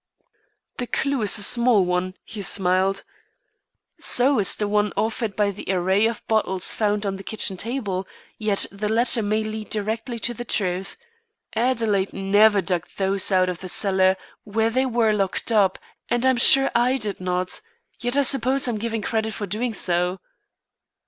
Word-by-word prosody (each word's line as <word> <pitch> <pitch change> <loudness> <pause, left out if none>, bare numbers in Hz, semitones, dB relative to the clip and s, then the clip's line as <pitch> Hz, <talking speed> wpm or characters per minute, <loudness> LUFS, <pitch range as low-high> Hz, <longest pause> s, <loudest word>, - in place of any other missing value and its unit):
"The 245 - -3
clew 275 0 -1
is 210 -1 +3
a 205 - +3
small 235 -3 +3
one," 180 +1 -1
he 215 -2 -7
smiled. 190 0 +1 1.0
"So 260 +1 +2
is 195 - +1
the 210 - -2
one 210 0 +1
offered 220 -2 -1
by 205 0 +1
the 200 - -10
array 190 +4 +2
of 230 -1 -5
bottles 190 -4 0
found 210 -1 0
on 195 -1 -2
the 195 - -10
kitchen 210 -2 -2
table; 200 -3 -3 0.3
yet 215 -2 +3
the 210 +1 -3
latter 230 +1 +2
may 215 +1 0
lead 215 0 -6
directly 225 +3 -3
to 235 +2 -2
the 240 - -6
truth. 190 -4 -2 0.6
Adelaide 225 -5 0
never 205 +1 +3
dug 175 -1 -2
those 195 0 +1
out 185 -1 +3
of 180 -1 -4
the 185 - -8
cellar 190 -1 +2 0.3
where 220 +2 0
they 260 +2 +1
were 230 -3 +2
locked 200 +2 -1
up, 200 -4 +3 0.3
and 240 +1 0
I'm 260 -1 +3
sure 270 +2 +6
I 245 +3 +2
did 210 -6 -5
not. 180 0 -2 0.4
Yet 245 +3 -1
I 285 - +4
suppose 265 0 +1
I'm 230 -3 -2
given 225 -1 -3
credit 220 0 -1
for 210 - -4
doing 220 +4 -3
so." 180 +1 0
210 Hz, 170 wpm, -23 LUFS, 190-230 Hz, 1.0 s, sure